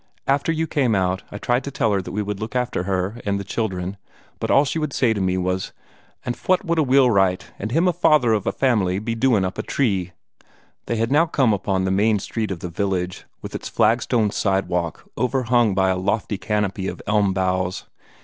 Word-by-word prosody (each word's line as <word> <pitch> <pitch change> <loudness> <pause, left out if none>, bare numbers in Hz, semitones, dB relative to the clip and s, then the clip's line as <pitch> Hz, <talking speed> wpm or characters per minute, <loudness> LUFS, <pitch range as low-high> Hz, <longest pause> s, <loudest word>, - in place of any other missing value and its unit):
After 140 +3 +1
you 160 0 0
came 130 -8 +1
out, 95 0 0
I 105 - -6
tried 120 +5 0
to 140 - -4
tell 115 -5 0
her 100 - +1
that - - -8
we 105 +1 -2
would 105 -1 -4
look 110 +3 -6
out 125 -1 0
for 90 - -2
her 95 +4 -2
and 100 -1 -1
the - - -4
children; 95 -2 -3 0.4
but - - -3
all 140 - +5
she 160 - -2
would 155 -3 -2
say 120 -4 +2
to 100 - -3
me 95 0 +1
was: 95 +1 -2 0.5
'An' 125 - -1
fwat 185 - 0
would 170 -1 +1
a - - +4
wheelwright, 120 -9 +3
an' 110 - -3
him 165 +9 +2
the 180 - +3
father 150 -8 +4
of 105 -3 -1
a - - +3
family, 100 -8 +1
be 110 +3 -2
doin' 115 -4 +2
up 90 - -4
a - - +2
tree?'" 95 -9 -1 0.7
They 115 - 0
had 115 +2 -1 0.2
come 130 -5 +3
now - - +3
upon 95 -1 -1
the 95 - 0
main 105 +3 +3
street 110 +2 -3
of 95 -4 -5
the - - -4
village, 90 0 -2 0.2
with - - -7
its - - -5
flagstone 115 -2 +2
sidewalk 90 -5 -1
overhung 120 -4 +2
by 95 0 +3
a 95 - 0
lofty 100 +1 -1
canopy 105 -3 -1
of - - -6
elm 105 -2 +2
boughs. 95 -1 -1
105 Hz, 220 wpm, -22 LUFS, 95-125 Hz, 0.7 s, all